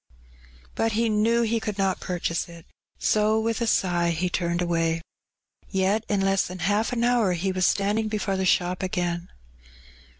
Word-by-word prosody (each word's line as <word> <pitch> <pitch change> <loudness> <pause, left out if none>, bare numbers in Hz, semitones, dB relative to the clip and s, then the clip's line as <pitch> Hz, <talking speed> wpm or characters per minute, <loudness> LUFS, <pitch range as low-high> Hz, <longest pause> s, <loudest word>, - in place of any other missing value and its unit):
But 225 -1 0
he 230 +1 +1
knew 225 +2 +2
he 230 0 +1
could 210 -2 -4
not 195 -1 0
purchase 175 -2 -2
it, 170 -1 -12 0.3
so 215 +1 +2
with 225 +2 -1
a 235 - +1
sigh 175 -5 +2
he 175 +2 -1
turned 170 -1 -1
away. 165 -2 0 0.7
Yet 195 +3 +1
in 205 -2 +1
less 195 0 +2
than 180 - -7
half 205 +5 0
an 240 -1 -1
horn* 235 -7 +2
he 190 +3 -1
was 185 -1 +2
standing 210 +2 +1
before 210 -2 -1
the 190 - -1
shop 180 -1 +1
again. 175 -2 -2
195 Hz, 170 wpm, -25 LUFS, 175-215 Hz, 0.7 s, knew